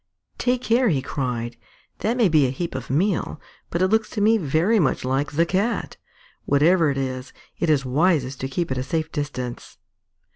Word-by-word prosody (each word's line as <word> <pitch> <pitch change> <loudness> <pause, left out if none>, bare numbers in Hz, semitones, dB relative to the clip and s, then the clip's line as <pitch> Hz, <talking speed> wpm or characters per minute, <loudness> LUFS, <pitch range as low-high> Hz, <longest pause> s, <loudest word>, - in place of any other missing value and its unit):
"Take 250 0 0
care!" 240 +1 +3
he 135 -5 0
cried. 120 -3 -3 0.4
"That 230 +3 0
may 235 -5 +4
be 155 -5 +4
a - - -2
heap 170 +6 -4
of 130 -1 -6
meal, 170 +2 0 0.3
but 170 +2 0
it 185 - +3
looks 220 +1 +2
to 215 - -4
me 220 +2 +4
very 170 +8 +2
much 150 -6 +1
like 135 +3 -1
the 165 +3 +3
Cat. 195 +7 -1 0.5
Whatever 160 +3 +4
it 140 - -2
is, 130 -1 -4 0.3
it 170 - 0
is 140 -3 +2
wisest 140 -1 +1
to 130 - -1
keep 160 +3 -3
at 130 - -1
a - - -2
safe 160 +1 -2
distance." 135 -5 -5
155 Hz, 190 wpm, -23 LUFS, 130-185 Hz, 0.5 s, may